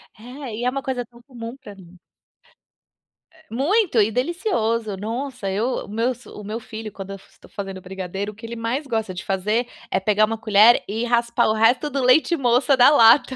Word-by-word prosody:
É, 245 +1 -8
e 235 - -5
é - - +3
uma 275 +2 -3
coisa 250 -2 -3
tão 235 +1 -19
comum 240 -2 -9
pra 205 -6 -12
mim. 180 -2 -16 1.3
Eh. 320 0 -24
Muito 325 - +2
e 210 +2 +2
delicioso. 230 - -1
Nossa, 235 +1 -4
eu 220 +7 -1
o - - -16
meu 225 +5 0 0.2
o 210 - -9
meu 215 +3 -5
filho 220 -1 -8
quando 195 0 -8
eu - - -5
estou - - -20
fazendo 195 -2 -7
brigadeiro, 190 +2 -5
o - - -19
que 225 +2 -11
ele 235 +1 -6
mais 235 +6 -3
gosta 220 -6 -2
de 185 - -7
fazer, 210 +5 0 0.2
é 190 - +2
pegar 210 +2 +3
uma 225 +1 -4
colher 220 +1 +5
e 225 +4 -2
raspar 235 0 +1
o 215 - +2
resto 240 +7 +3
do 275 -2 -2
leite 310 +7 +4
moça 255 +1 +3
da 250 +2 +8
lata. 260 -1 +5
230 Hz, 200 wpm, -22 LUFS, 210-255 Hz, 1.3 s, da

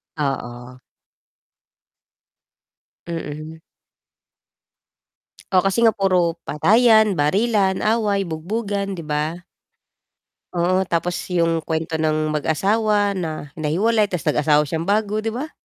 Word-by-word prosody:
Oo. 125 -3 -4 2.3
Mm. 160 -1 -6 1.9
Oh, 185 -1 +4
kasi 195 +3 +1
nga 230 -1 +4
puro 180 -4 +1
patayan, 220 +5 +4
barilan, 190 +5 +1
away, 210 -3 +1
bugbugan, 195 +3 -3
'di - - -6
ba? 150 +3 -2 1.2
Oo, 185 +2 +1
tapos 170 +1 0 0.2
yung 165 -2 +1
kwento 160 0 -3
ng 155 -1 0
mag-asawa 205 +7 +1
na 160 -6 -5
nahiwalay, 205 +8 +1
tapos 180 -4 -1
nag-asawa 150 0 +3
siyang 160 +3 -4
bago 210 +1 +1
'di 220 - -4
ba? 300 +5 -5
180 Hz, 100 wpm, -21 LUFS, 155-205 Hz, 2.3 s, Oh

